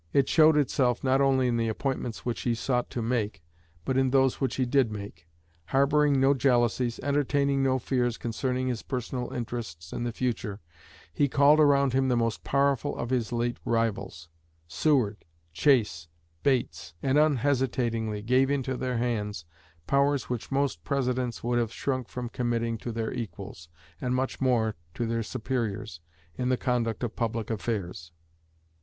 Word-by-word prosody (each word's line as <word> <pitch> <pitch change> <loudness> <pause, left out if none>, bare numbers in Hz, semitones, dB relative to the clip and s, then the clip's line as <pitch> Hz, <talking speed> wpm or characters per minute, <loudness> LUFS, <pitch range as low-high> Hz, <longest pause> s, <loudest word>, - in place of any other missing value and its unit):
It 140 - +4
showed 155 -1 +5
itself 130 -4 +1
not 135 +1 +3
only 135 -2 +3
in 120 -1 +1
the 115 -1 0
appointments 120 0 -3
which 120 -1 -2
he 120 -2 0
sought 125 +1 -1
to 120 - -3
make 110 -8 -2 0.4
but 130 - 0
in 135 0 +3
those 135 0 +2
which 130 -3 0
he 130 - +1
did 125 -2 +2
make. 100 -6 -8 0.4
Harboring 140 +1 +3
no 135 +1 +5
jealousies, 120 -2 +1
entertaining 140 -1 +1
no 130 -1 +2
fears 120 -1 0
concerning 125 +2 -2
his 120 -3 -2
personal 125 -1 -4
interests 110 -9 -5
in - - -3
the 120 - -1
future, 110 -4 -3 0.5
he 140 - +2
called 145 +3 +5
around 140 -3 +4
him 135 0 +2
the 125 -2 +2
most 115 -1 -1
powerful 140 0 +1
of 120 - -4
his 125 -3 0
late 120 0 -1
rivals 100 -8 -1 0.4
Seward, 110 - +1 0.3
Chase, 105 - +2 0.3
Bates 130 - -1
and 135 +2 +3
unhesitatingly 125 -7 +1
gave 130 +4 +3
into 135 -2 -1
their 125 -1 -2
hands 105 -7 -2 0.4
powers 140 -1 +1
which 125 +1 -4
most 135 - 0
Presidents 125 -3 -1
would 120 0 +1
have 115 -2 -1
shrunk 130 -1 -2
from 125 -1 -5
committing 115 -1 -1
to 120 - -5
their 115 -1 -3
equals, 100 -8 -7 0.3
and 125 0 0
much 130 +1 -2
more 120 -4 +2 0.2
to 120 - -1
their 115 0 -1
superiors, 110 -5 -3 0.4
in 125 0 -1
the 130 - +2
conduct 120 -3 -1
of 120 - -3
public 115 -1 -2
affairs." 95 -7 -4
125 Hz, 160 wpm, -28 LUFS, 115-135 Hz, 0.5 s, showed